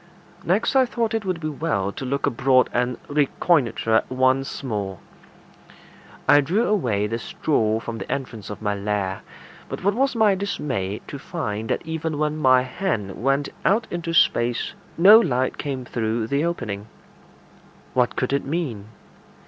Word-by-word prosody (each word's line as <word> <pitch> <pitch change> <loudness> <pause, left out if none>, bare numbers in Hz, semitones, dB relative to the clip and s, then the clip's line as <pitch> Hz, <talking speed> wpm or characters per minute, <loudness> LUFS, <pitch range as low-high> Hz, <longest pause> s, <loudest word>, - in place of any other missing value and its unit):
Next - - +1
I 260 -1 +5
thought 230 -2 -1
it 220 -2 -1
would 185 -3 -1
be 155 - -3
well 140 -10 -1
to 130 - -6
look 140 +2 -1
abroad 130 +1 +3
and 125 0 0
reconnoitre 140 -5 +2
once 130 +2 +1
more. 100 -7 -3 1.3
I 145 - +7
drew 180 +11 +1
away 120 - +1
the 115 +2 -2
straw 110 -4 0
from 115 0 -6
the - - -6
entrance 120 -6 -4
to 105 - -6
my 105 -1 0
lair; 100 -1 -2 0.5
but - - -6
what 200 +2 +3
was 270 +3 +1
my 220 -3 +4
dismay 130 - -3
to 140 - -7
find 110 - -4
that - - -1
even 160 -1 -3
when 150 0 0
my 130 -3 +4
hand 125 - -3
went 135 +3 +1
out 200 +9 +3
into 170 -1 -3
space 120 -7 +2 0.2
no 200 +6 +9
light 130 - 0
came 135 -3 -4
through 110 -1 -1
the 140 +6 0
opening. 110 -11 -3 1.1
What 125 -1 +1
could 130 +1 -1
it 140 - +1
mean? 135 -9 -3
135 Hz, 155 wpm, -23 LUFS, 115-165 Hz, 1.3 s, no